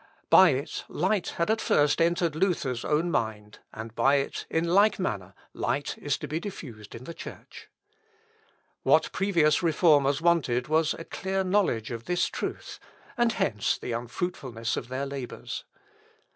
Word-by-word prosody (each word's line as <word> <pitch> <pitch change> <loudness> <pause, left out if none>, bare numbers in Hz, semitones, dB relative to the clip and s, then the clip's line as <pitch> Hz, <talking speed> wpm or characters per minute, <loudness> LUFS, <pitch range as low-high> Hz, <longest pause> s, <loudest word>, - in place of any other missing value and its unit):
By - - +9
it - - -2
light 205 -5 0
had 170 +5 +1
at 220 - 0
first 145 +2 +3
entered 170 -1 +2
Luther's 155 -9 0
own 160 +3 +1
mind, 110 -5 -3
and 110 +1 -8
by 135 +4 +3
it, 140 -1 -2
in 165 +1 0
like 200 +5 +4
manner, 100 - -3 0.2
light 145 - -2
is 145 -1 -1
to 150 - -6
be 155 +4 -2
diffused 125 - -8
in 115 - -9
the 170 - -7
Church. - - -11 1.1
What - - +3
previous 170 -6 +2
reformers 150 -4 +3
wanted 155 -8 +2
was 155 0 +2
a 165 - -8
clear 190 0 -2
knowledge 185 - +1
of 115 -1 -6
this 175 0 +1
truth; - - -5 0.4
and 240 -3 +2
hence 105 - 0
the - - -6
unfruitfulness 120 -1 -3
of 120 - -5
their 130 +2 -3
labours. 135 -3 -6
150 Hz, 155 wpm, -27 LUFS, 120-175 Hz, 1.1 s, By